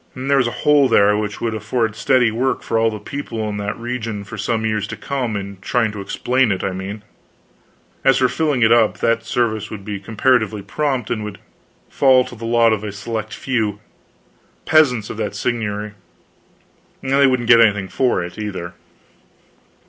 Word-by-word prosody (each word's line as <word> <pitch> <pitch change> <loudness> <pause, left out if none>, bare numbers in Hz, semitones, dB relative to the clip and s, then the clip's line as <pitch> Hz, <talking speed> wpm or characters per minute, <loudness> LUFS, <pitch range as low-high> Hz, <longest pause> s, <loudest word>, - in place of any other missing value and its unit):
There 135 +2 +1
was 125 -3 +3
a 120 - -5
hole 145 -2 +5
there 105 -3 +4
which 105 0 -3
would 115 -1 -1
afford 110 +1 -1
steady 125 0 +3
work 125 +4 -1
for 115 - 0
all 115 0 +3
the 110 - -5
people 115 -2 -5
in 105 -1 -4
that 105 0 -3
region 115 -3 -4
for 100 +3 -9
some 110 +1 -1
years 110 -2 -1
to - - -7
come 130 -6 -3
in 100 -1 -7
trying 115 +2 0
to 105 -1 -7
explain 125 +4 +1
it, 95 - -2
I 95 - -1
mean; 95 +3 -6 1.0
as 135 - +5
for 130 - +3
filling 145 -4 0
it 115 - +4
up, 115 -2 +4
that 115 0 +1
service 110 -3 -1
would 100 -3 -8
be 105 -2 -4
comparatively 110 0 +1
prompt, 130 +1 -2
and 110 -2 -2
would 105 -2 -6 0.5
fall 130 -2 +4
to - - -10
the 115 0 -8
lot 115 -1 +4
of 105 -1 -3
a 105 - -4
select 110 +1 -5
few 110 -6 -1 0.9
peasants 130 -9 +3
of - - -7
that 105 -2 -3
seignory; 105 -2 -2 1.1
and 135 - -3
they 140 0 +5
wouldn't 125 -3 0
get 115 -2 +8
anything 105 -3 +3
for 120 -4 0
it, 90 +4 -8
either. 95 -4 -5
110 Hz, 185 wpm, -19 LUFS, 105-125 Hz, 1.1 s, get